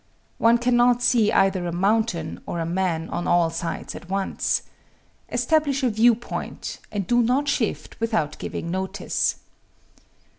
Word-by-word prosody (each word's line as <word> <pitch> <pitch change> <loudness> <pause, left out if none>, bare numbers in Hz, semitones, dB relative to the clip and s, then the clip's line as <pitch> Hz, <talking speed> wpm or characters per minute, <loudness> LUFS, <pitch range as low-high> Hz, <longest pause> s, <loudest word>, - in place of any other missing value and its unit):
One 230 +1 +5
cannot 245 0 +3
see 225 -4 +4
either 190 -2 +2
a - - -2
mountain 190 -2 0
or 170 - -3
a 165 - -1
man 170 -2 -1
on 175 - -3
all 175 -2 +3
sides 165 +1 -4
at 175 - -10
once. 195 0 -1 0.7
Establish 295 -4 +1
a 250 - +3
view 225 +2 +5
point, 240 +2 -6
and 205 -3 -2
do 240 +3 +3
not 255 +5 +1
shift - - -2
without 220 -10 -1
giving 170 - -5
notice. 190 +2 -1
205 Hz, 145 wpm, -24 LUFS, 175-240 Hz, 0.7 s, One